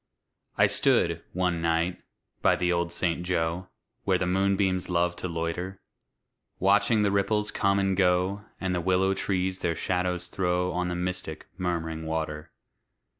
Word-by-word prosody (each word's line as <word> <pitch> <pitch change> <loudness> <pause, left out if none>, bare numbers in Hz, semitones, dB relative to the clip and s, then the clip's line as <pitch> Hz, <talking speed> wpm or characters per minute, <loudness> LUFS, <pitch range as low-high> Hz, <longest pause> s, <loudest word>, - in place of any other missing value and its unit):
I - - +6
stood, - - +2
one 90 -2 0
night, 85 +2 0 0.4
by - - +4
the 90 0 +1
old 85 0 0
St. 85 0 0
Joe, 90 0 -1 0.4
Where 95 -2 +2
the 95 - -1
moonbeams 95 0 +1
love 85 0 +1
to - - -4
loiter; 85 +3 -3 0.8
Watching 105 +3 +3
the 100 - +2
ripples 105 +1 +1
come 100 0 +2
and 95 -1 +1
go 90 +2 +2 0.2
And 95 -1 -1
the 90 - 0
willow 95 +2 +2
trees 95 -1 -1
their 85 -1 0
shadows 90 0 -1
throw 90 -1 0
On 90 0 -1
the 90 - -2
mystic, 90 -3 -4
murm'ring 80 -3 -2
water. 80 -1 -3
90 Hz, 150 wpm, -27 LUFS, 85-95 Hz, 0.8 s, I